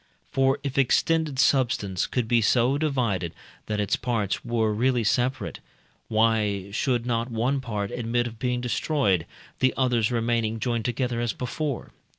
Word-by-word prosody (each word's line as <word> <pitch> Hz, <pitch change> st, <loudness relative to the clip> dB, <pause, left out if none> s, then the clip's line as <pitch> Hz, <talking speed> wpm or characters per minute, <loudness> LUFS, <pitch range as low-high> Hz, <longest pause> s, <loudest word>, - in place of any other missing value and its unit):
For 135 Hz, +1 st, +2 dB
if 140 Hz, -1 st, -1 dB
extended 155 Hz, +2 st, +2 dB
substance 120 Hz, -9 st, +2 dB
could 125 Hz, -3 st, -1 dB
be 120 Hz, 0 st, +3 dB
so 120 Hz, +4 st, +3 dB
divided 115 Hz, -, 0 dB, 0.3 s
that 105 Hz, -1 st, -1 dB
its 105 Hz, -, +1 dB
parts 110 Hz, -6 st, -1 dB
were 115 Hz, -2 st, 0 dB
really 120 Hz, +2 st, +1 dB
separate, 125 Hz, +4 st, 0 dB, 0.5 s
why 110 Hz, -3 st, +1 dB
should 120 Hz, +2 st, 0 dB
not 120 Hz, 0 st, -1 dB
one 125 Hz, +4 st, 0 dB
part 105 Hz, -5 st, -3 dB
admit 120 Hz, 0 st, -1 dB
of 115 Hz, -2 st, -7 dB
being 125 Hz, -1 st, -1 dB
destroyed, 120 Hz, -, +1 dB, 0.3 s
the 130 Hz, -, +2 dB
others 125 Hz, -4 st, +2 dB
remaining 115 Hz, -1 st, 0 dB
joined 115 Hz, -1 st, -1 dB
together 120 Hz, -1 st, -1 dB
as 120 Hz, -1 st, -1 dB
before? 135 Hz, +2 st, -4 dB
120 Hz, 150 wpm, -26 LUFS, 110-130 Hz, 0.5 s, be